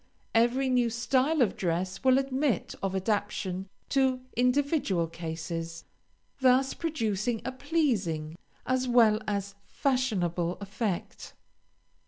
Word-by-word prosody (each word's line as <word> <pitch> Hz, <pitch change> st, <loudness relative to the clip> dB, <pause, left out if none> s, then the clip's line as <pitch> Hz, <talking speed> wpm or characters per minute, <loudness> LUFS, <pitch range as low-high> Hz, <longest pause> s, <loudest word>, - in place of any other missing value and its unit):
Every 240 Hz, +4 st, +3 dB
new 250 Hz, -2 st, +2 dB
style 255 Hz, +6 st, +2 dB
of 215 Hz, -, 0 dB
dress 185 Hz, +3 st, -2 dB
will 260 Hz, 0 st, +5 dB
admit 270 Hz, -, 0 dB
of 195 Hz, -1 st, -1 dB
adaptation 195 Hz, -2 st, -1 dB, 0.2 s
to 265 Hz, -2 st, +2 dB
individual 250 Hz, -, +2 dB
cases, 165 Hz, 0 st, -5 dB, 0.5 s
thus 265 Hz, +1 st, +4 dB
producing 230 Hz, -, -1 dB
a 260 Hz, -, -2 dB
pleasing, 240 Hz, -, -1 dB, 0.3 s
as 255 Hz, 0 st, 0 dB
well 230 Hz, -3 st, +5 dB
as 200 Hz, -1 st, -2 dB
fashionable 185 Hz, -11 st, 0 dB
effect. 200 Hz, -1 st, -4 dB
230 Hz, 105 wpm, -29 LUFS, 185-260 Hz, 0.5 s, will